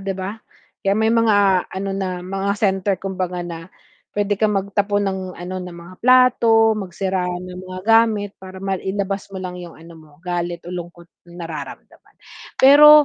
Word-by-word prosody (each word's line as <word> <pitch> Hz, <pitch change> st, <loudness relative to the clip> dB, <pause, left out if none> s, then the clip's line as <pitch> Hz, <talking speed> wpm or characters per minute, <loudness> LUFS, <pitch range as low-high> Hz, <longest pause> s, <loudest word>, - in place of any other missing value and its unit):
di 195 Hz, 0 st, -2 dB
ba? 200 Hz, +4 st, -5 dB, 0.4 s
Kaya 195 Hz, -, +3 dB
may 220 Hz, 0 st, +2 dB
mga 205 Hz, -5 st, +3 dB
ano 195 Hz, +1 st, -4 dB
na 185 Hz, -2 st, -3 dB
mga 195 Hz, +1 st, -1 dB
center 195 Hz, -1 st, +1 dB
kumbaga 185 Hz, -2 st, -3 dB
na 165 Hz, 0 st, -7 dB, 0.5 s
pwede 205 Hz, 0 st, +1 dB
kang 210 Hz, -2 st, +2 dB
magtapon 200 Hz, +1 st, 0 dB
ng 190 Hz, 0 st, -3 dB, 0.2 s
ano 180 Hz, +2 st, -6 dB
ng 180 Hz, -1 st, -7 dB
mga 170 Hz, +2 st, -12 dB
plato 235 Hz, -3 st, +5 dB
magsira 190 Hz, -1 st, -2 dB
ng 180 Hz, +1 st, -6 dB
mga 185 Hz, 0 st, -7 dB
gamit 225 Hz, -2 st, +3 dB
para 190 Hz, 0 st, -10 dB
mailabas 195 Hz, +1 st, -3 dB
mo 190 Hz, -, -6 dB
lang 180 Hz, -1 st, -5 dB
yung 170 Hz, -2 st, -10 dB
ano 165 Hz, +1 st, -14 dB
mo 155 Hz, -2 st, -17 dB
galit 175 Hz, -1 st, -3 dB
o 175 Hz, -, -7 dB
lungkot 175 Hz, -1 st, -8 dB, 0.2 s
nararamdaman. 165 Hz, -4 st, -9 dB, 0.5 s
Pero 300 Hz, +2 st, +9 dB
190 Hz, 160 wpm, -21 LUFS, 180-205 Hz, 0.5 s, Pero